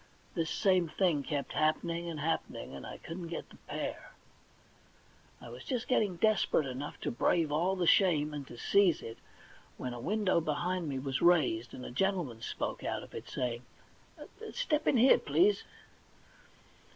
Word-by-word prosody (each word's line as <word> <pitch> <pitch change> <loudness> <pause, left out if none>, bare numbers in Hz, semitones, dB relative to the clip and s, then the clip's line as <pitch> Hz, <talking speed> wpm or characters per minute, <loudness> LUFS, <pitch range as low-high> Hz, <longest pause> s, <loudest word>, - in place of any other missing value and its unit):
This 165 -2 -1
same 185 -3 +2
thing 165 -3 +1
kept 140 0 -3
happening 165 +2 0
and 160 -2 -5
happening, 160 - -2
and 70 - -8
I - - -7
couldn't 170 +1 -7
get 170 - -6
the - - -14
pear. - - -5 1.3
I 120 - -10
was 125 +2 -9
just 245 -2 -3
getting 210 -7 +2
desperate 210 -5 +2
enough 135 +2 -5
to - - -1
brave 160 +5 +1
all 175 +6 +1
the 180 -2 0
shame, 155 -5 +4
and 145 -2 -6
to 120 - -10
seize 195 +3 +3
it, 115 0 -8 0.6
when 125 -1 -4
a 120 - -6
window 195 - +1
behind 165 +2 -1
me 135 - -2
was 135 0 -2
raised, 150 -10 +3
and 125 - -8
a - - -7
gentleman 165 - -1
spoke - - -4
out - - -2
of - - -14
it, - - -7
saying: 120 -2 -2 0.5
* 445 0 -11
Step 310 -12 0
in - - +4
here, 250 +4 +6
please.' 410 +4 +3
165 Hz, 170 wpm, -32 LUFS, 140-190 Hz, 1.3 s, here